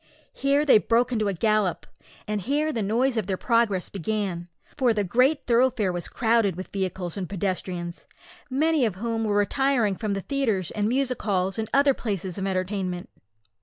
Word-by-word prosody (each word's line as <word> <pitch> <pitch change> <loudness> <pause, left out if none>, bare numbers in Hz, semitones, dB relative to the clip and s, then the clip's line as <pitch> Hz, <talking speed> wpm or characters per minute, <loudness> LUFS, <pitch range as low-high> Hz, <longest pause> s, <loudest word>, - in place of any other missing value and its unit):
Here 280 +2 +1
they 265 -7 +7
broke 235 +3 +1
into 215 -3 0
a 200 - 0
gallop, 215 -1 +1 0.4
and 210 -1 -2
here 295 - 0
the 225 - -1
noise 235 +5 +1
of 210 -4 -1
their 190 -2 -1
progress 230 -6 +1
began, 195 -2 -3 0.3
for 250 -5 +2
the 205 - +1
great 255 - +2
thoroughfare 235 -5 +2
was 175 -1 -4
crowded 225 -5 +1
with 185 +1 -8
vehicles 185 -2 -3
and 185 -3 -4
pedestrians, 185 -2 -4 0.4
many 305 +2 +2
of 215 -6 0
whom 225 +2 -2
were 205 -1 0
retiring 225 0 +2
from 210 0 -2
the 195 - -3
theatres 225 - -1
and 210 -1 -1
music 255 0 0
halls, 195 0 0
and 220 - -3
other 280 0 +4
places 195 -6 -3
of 195 - -2
entertainment. 185 -1 -2
210 Hz, 175 wpm, -25 LUFS, 190-245 Hz, 0.4 s, they